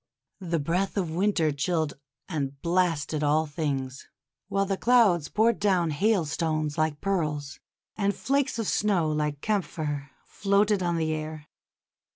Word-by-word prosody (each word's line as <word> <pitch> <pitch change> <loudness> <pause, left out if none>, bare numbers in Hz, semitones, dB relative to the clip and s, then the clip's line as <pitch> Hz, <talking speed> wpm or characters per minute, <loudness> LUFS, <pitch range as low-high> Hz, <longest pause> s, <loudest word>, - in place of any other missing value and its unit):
The 170 -3 -1
breath 175 +7 -1
of 175 -5 -1
Winter 175 -3 +1
chilled 155 +1 -1 0.3
and 140 -5 -3
blasted 170 -4 +1
all 150 +2 +3
things, 140 -4 -3 0.4
while 195 0 +1
the 195 0 -1
clouds 200 -9 +3
poured 225 +1 +2
down 185 -5 +2
hailstones 155 -4 0
like 155 -2 0
pearls, 150 -7 -2 0.4
and 200 -1 0
flakes 275 -1 0
of 225 -3 -2
snow 185 -7 +1
like 150 -1 -1
camphor 150 -8 -2 0.2
floated 200 0 +1
on 175 -1 0
the 160 -1 0
air. 155 -1 -6
165 Hz, 135 wpm, -27 LUFS, 150-195 Hz, 0.4 s, all